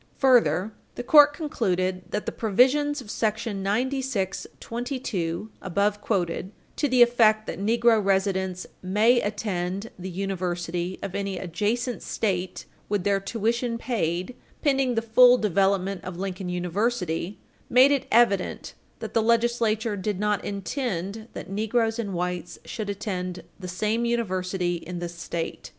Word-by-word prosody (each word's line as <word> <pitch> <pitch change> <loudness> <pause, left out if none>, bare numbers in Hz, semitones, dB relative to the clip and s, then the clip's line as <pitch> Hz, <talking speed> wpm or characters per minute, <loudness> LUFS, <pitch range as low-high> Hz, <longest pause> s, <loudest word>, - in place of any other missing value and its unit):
Further, 235 -6 +3 0.2
the 245 - -4
court 295 +2 +7
concluded 185 - -1
that 210 - -3
the - - -2
provisions 265 +7 +2
of 240 - -12
§ 220 0 -1
9622 220 -3 -2
(above 200 +3 0
quoted) 185 -2 -1 0.2
to 295 - 0
the 250 -1 +7
effect 220 -3 +4
that - - -5
negro 225 +1 +3
residents 190 -2 0 0.2
"may 215 +6 +3
attend 200 -1 -3
the 185 +1 -5
university 180 -1 -3
of 200 -2 -4
any 200 -1 -2
adjacent 215 +8 -2
State 185 -4 -2 0.2
with 205 -3 0
their 200 0 +2
tuition 230 +3 -1
paid, 185 -3 -2 0.3
pending 270 -4 +2
the 225 - 0
full 245 +2 +7
development 195 -2 +1
of 180 -2 -6
Lincoln 190 -1 -4
University," 180 0 -1 0.3
made 255 +3 +6
it 280 -2 0
evident 215 -5 +2 0.3
"that - - -6
the 225 - +3
Legislature 230 -1 +1
did 200 0 -3
not 210 -1 0
intend 200 0 -3
that - - -7
negroes 225 +3 0
and 200 -5 -3
whites 180 0 -3
should 215 -3 -5
attend 185 -3 -4 0.2
the 185 - -6
same 215 +6 -1
university 185 -6 -1
in 175 +1 -7
this 175 0 -5
State." 170 -1 -5
205 Hz, 135 wpm, -25 LUFS, 185-235 Hz, 0.3 s, court